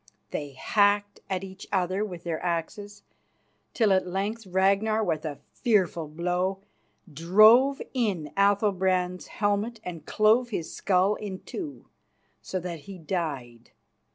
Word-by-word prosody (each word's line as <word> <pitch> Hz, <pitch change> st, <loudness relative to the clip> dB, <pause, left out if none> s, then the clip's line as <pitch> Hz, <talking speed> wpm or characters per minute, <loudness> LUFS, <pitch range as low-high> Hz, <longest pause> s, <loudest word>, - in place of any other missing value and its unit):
They 145 Hz, -2 st, -4 dB
hacked 205 Hz, +7 st, +1 dB
at 190 Hz, -1 st, -2 dB
each 190 Hz, 0 st, -10 dB
other 190 Hz, +1 st, 0 dB
with 180 Hz, -5 st, -6 dB
their 165 Hz, -2 st, -3 dB
axes, 200 Hz, +5 st, -4 dB, 0.7 s
till 215 Hz, -5 st, +4 dB
at 185 Hz, -1 st, +1 dB
length 200 Hz, +4 st, -3 dB
Ragnar, 200 Hz, +4 st, +2 dB
with 160 Hz, -5 st, -1 dB
a 145 Hz, -3 st, -4 dB, 0.2 s
fearful 185 Hz, -8 st, +1 dB
blow, 180 Hz, +4 st, -2 dB, 0.5 s
drove 215 Hz, -, +6 dB
in 195 Hz, -, -1 dB
Athalbrand's 190 Hz, -3 st, +1 dB
helmet 210 Hz, +2 st, -1 dB
and 170 Hz, -4 st, -7 dB
clove 225 Hz, +3 st, +3 dB
his 175 Hz, -8 st, -4 dB
skull 190 Hz, +1 st, +2 dB
in 200 Hz, -3 st, -6 dB
two, 315 Hz, -7 st, -7 dB, 0.5 s
so 185 Hz, -, -4 dB
that 170 Hz, -2 st, -5 dB
he 195 Hz, -, -7 dB
died. 145 Hz, -9 st, -4 dB
190 Hz, 125 wpm, -27 LUFS, 175-205 Hz, 0.7 s, drove